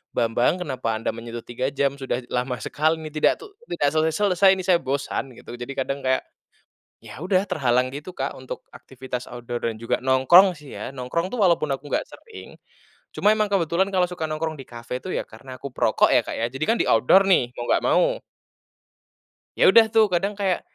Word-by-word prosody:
Bambang 120 +9 +1
kenapa 130 -7 -3
anda 110 - -3
menyentuh 115 0 -7
3 125 +2 -3
jam, 140 0 0
sudah 130 -1 -2
lama 125 +1 -1
sekali 155 +2 0
ini, 155 - -6
tidak 155 - +2
tuh 415 -1 -13 0.2
tidak 145 - +1
selesai-selesai 180 +5 +3
ini - - -3
saya 185 -2 +4
bosan 135 -1 -3
gitu, - - -11
jadi 120 +3 -6
kadang 140 0 -4
kayak, 130 0 +2 0.8
ya 135 - -11
udah 185 +1 +1
terhalang 130 -9 +1
gitu 150 +6 -7
Kak, 135 +1 -2
untuk 130 0 -8
aktivitas 130 -1 -7
outdoor 120 0 -6
dan 110 - -6
juga 115 - -1
nongkrong 155 +8 +5
sih 145 -1 -12
ya. - - -5
Nongkrong 135 +7 -3
tuh 250 - -3
walaupun 170 -5 +3
aku 135 +2 -7
enggak - - +2
sering, 450 -3 -13 0.6
cuma 210 - +3
emang 215 -1 0
kebetulan 190 +1 +1
kalau 180 -2 +2
suka 175 -2 -6
nongkrong 155 +1 -3
di - - -7
kafe 120 +1 -6
tuh 185 - -5
ya - - -1
karena 130 +3 -12
aku 140 - -6
perokok - - +2
ya - - +4
Kak, - - -5
ya, 115 - -1
jadi 135 +3 -4
kan 230 - +2
di - - +1
outdoor 125 +12 +5
nih, 125 -11 +3
mau 120 - -3
enggak - - +2
mau. - - +3 1.4
Ya - - +3
udah 230 -1 +7
tuh 220 -1 +6
kadang 195 +4 0
kayak, 190 -3 0
140 Hz, 200 wpm, -23 LUFS, 125-185 Hz, 1.4 s, udah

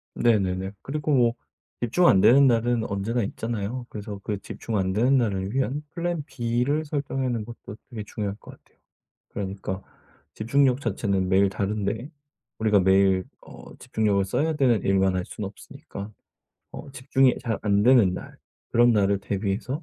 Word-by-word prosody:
네네네. 95 -4 +1
그리고 150 +1 -2
뭐 120 -3 +4 0.5
집중 150 +10 +3
안 95 - +6
되는 135 +7 +6
날은 120 -1 +2
언제나 105 +4 -1
있잖아요. 115 +3 -4
그래서 105 -1 -7
그 105 -2 -2
집중 110 -2 -4
안 95 -1 0
되는 125 +7 +3
날을 100 -4 -1
위한 135 +2 -1
플랜 170 -3 -2
B를 130 +3 -1
설정하는 135 -6 -2
것도 115 -3 -10
되게 115 -4 -6
중요할 100 -2 -4
것 - - -13
같아요. - - -22 0.5
그러니까 95 -1 -5 0.5
집중력 130 +3 +2
자체는 100 -5 -1
매일 95 +1 +4
다른데 105 +6 -2 0.5
우리가 105 -2 +3
매일 95 0 +4 0.2
어 - - -13
집중력을 105 -3 0
써야 155 +11 0
되는 130 -7 +2
일만 95 -1 +2
할 90 - -1
수는 105 -3 -6
없으니까 100 +1 -10 0.6
어 145 - -9
집중이 135 0 +2
잘 115 -3 -2
안 100 -1 +2
되는 115 -7 +5
날 - - -9 0.3
그런 120 0 +5
날을 100 -2 +2
대비해서 105 - -3
110 Hz, 325 characters per minute, -25 LUFS, 100-130 Hz, 0.6 s, 안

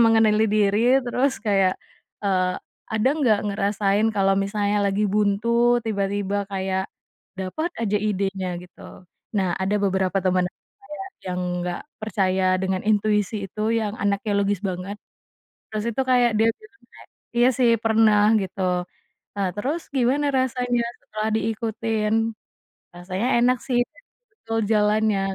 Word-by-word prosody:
mengenali 220 -1 +4
diri, 205 -1 +3 0.3
terus 255 +3 +1
kayak, 195 -2 +3 0.5
eee, 185 -2 +1 0.4
ada 220 +4 +2
nggak 225 -8 +3
ngerasain 200 +1 +1
kalau 195 0 +3
misalnya 205 +1 0
lagi 200 +2 0
buntu, 235 +4 +3
tiba-tiba 200 -2 -1 0.2
kayak, 190 0 -1 0.5
dapat 250 - -3
aja 210 -2 +1
idenya, 195 -2 -1
gitu. 180 0 -17 0.6
Nah, 190 -3 +1
ada 195 +2 0
beberapa 190 0 +1
teman 185 -1 +2 0.4
saya 390 -2 -8 0.2
yang 180 0 -2 0.2
nggak 175 -1 -3 0.2
percaya 190 -3 0 0.2
dengan 190 -1 -1
intuisi 210 -1 +1
itu, 210 +3 -5 0.2
yang 210 -1 -2
anaknya 205 +1 0
logis 200 -1 0
banget. 185 +2 -4 0.7
Terus 215 -1 -3
itu, 265 - +1
kayak 245 -2 +4
dia 225 - +4
bilang 435 -2 -19
kayak, - - -16 0.3
"Iya 240 +1 +5
sih 245 -2 +4
pernah," 220 -2 +4 0.2
gitu. 190 0 -5 0.7
"Nah, 200 -2 0
terus 285 +11 -2
gimana 265 +3 +2
rasanya 250 -2 0 0.2
setelah 215 0 -3
diikutin?""Rasanya 225 0 -1 0.9
enak 250 +1 +3
sih, 250 -3 +1 0.6
betul 225 - -4
jalannya." 210 -1 +2
210 Hz, 125 wpm, -23 LUFS, 195-225 Hz, 0.9 s, Iya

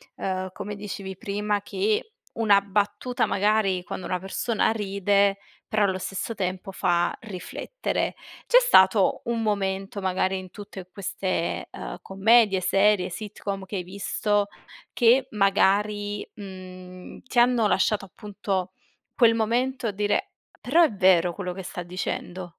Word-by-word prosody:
uhm, 185 0 -3
come 210 0 -6
dicevi 195 -2 -6
prima, 205 +1 -2
che 210 - -1 0.2
una 205 -3 +4
battuta 205 +5 0
magari 200 -2 +1
quando - - -6
una 180 -1 -2
persona 215 +4 0
ride 200 -1 +1 0.3
però 215 -1 +1
allo 190 -2 +1
stesso 190 +4 -4
tempo 190 -1 -3
fa 175 -2 +1
riflettere. 220 - -4 0.3
C'è - - +7
stato 190 - +5
un 230 -1 -1
momento 195 -1 -1
magari 190 0 0
in 185 -1 -8
tutte 200 -3 -10
queste, 185 -2 -3
uhm, - - -6
commedie, 195 0 +4
serie, 195 0 +3
sitcom 200 -1 -5
che 200 - -7
hai 180 - -2
visto, 200 +2 -1 0.5
che 250 +2 +4
magari, 205 +1 +1
mhmm, 185 -2 -10
ti 255 -1 0
hanno 240 -3 +4
lasciato 205 0 +1
appunto 195 -2 -4 0.4
quel 230 -3 +5
momento 240 +3 0
a - - 0
dire: 205 +1 0 0.3
"Però 330 +7 +4
è 310 - +3
vero 180 -3 +4
quello 180 -1 -4
che 190 0 -7
sta 180 - -6
dicendo"? 180 0 -5
200 Hz, 135 wpm, -25 LUFS, 185-210 Hz, 0.5 s, C'è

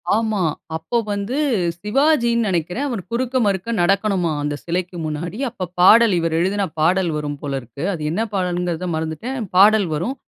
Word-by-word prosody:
ஆமா. 220 -2 0 0.3
அப்போ 200 +9 -2
வந்து, 205 +6 -2 0.4
சிவாஜின்னு 235 0 +2
நெனைக்கிறேன். 180 - -1
அவர் 230 -6 -3
குறுக்க, 250 +2 -2
மறுக்க 195 +1 -1
நடக்கணுமாம் 185 -4 +1
அந்த 145 0 -2
சிலைக்கு 175 +1 -3
முன்னாடி. 160 +5 -4
அப்ப 190 -6 -5
பாடல் 220 +3 +7
இவரு 165 -1 -1
எழுதின 195 +4 0 0.2
பாடல் 175 +2 +2
வரும் 145 -1 -4
போல 145 -2 -4
இருக்கு. 120 +5 -9
அது 165 - -6
என்ன 190 +7 -1
பாடல்ங்கிறத 180 -2 -1
மறந்துட்டேன். 160 - -4 0.2
பாடல் 205 0 +6
வரும். 180 - -2
185 Hz, 150 wpm, -20 LUFS, 165-220 Hz, 0.4 s, பாடல்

